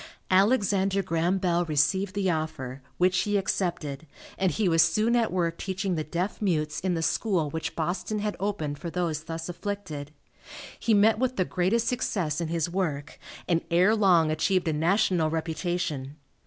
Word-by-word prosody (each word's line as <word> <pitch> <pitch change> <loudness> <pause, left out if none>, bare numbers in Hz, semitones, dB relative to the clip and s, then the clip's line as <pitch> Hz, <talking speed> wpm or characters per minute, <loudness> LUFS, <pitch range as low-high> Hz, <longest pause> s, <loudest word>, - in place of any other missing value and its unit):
Alexander 195 -1 +3
Graham 170 +1 +1
Bell 175 -2 +1
received 165 +6 +1
the 195 -2 +1
offer, 155 -5 -4 0.2
which 180 0 +3
he 205 -1 +1
accepted, 170 -6 -2 0.3
and 190 - +1
he 195 +5 0
was 165 -1 +4
soon 215 +9 +3
at 235 -2 +2
work 175 -2 -1
teaching 190 0 -2
the 155 -2 -1
deaf 175 +8 -3
mutes 155 -6 0
in 180 -1 -1
the 165 - -2
school 170 -5 0
which 160 +1 -4
Boston 175 +6 -2
had 210 0 -2
opened 160 -8 -2
for 170 - -5
those 165 -3 -2
thus 165 0 -5
afflicted. 175 -6 -5 0.7
He 225 - +2
met 215 +2 +4
with 255 0 0
the 185 - +1
greatest 195 +8 0
success 175 - -1
in 165 - -2
his 165 0 -1
work, 160 -5 -3 0.3
and 170 -1 +2
ere 180 +6 +4
long 175 -7 +4
achieved 180 +3 +1
a 160 - +1
national 170 0 +2
reputation. 160 -3 -3
175 Hz, 170 wpm, -27 LUFS, 160-195 Hz, 0.7 s, was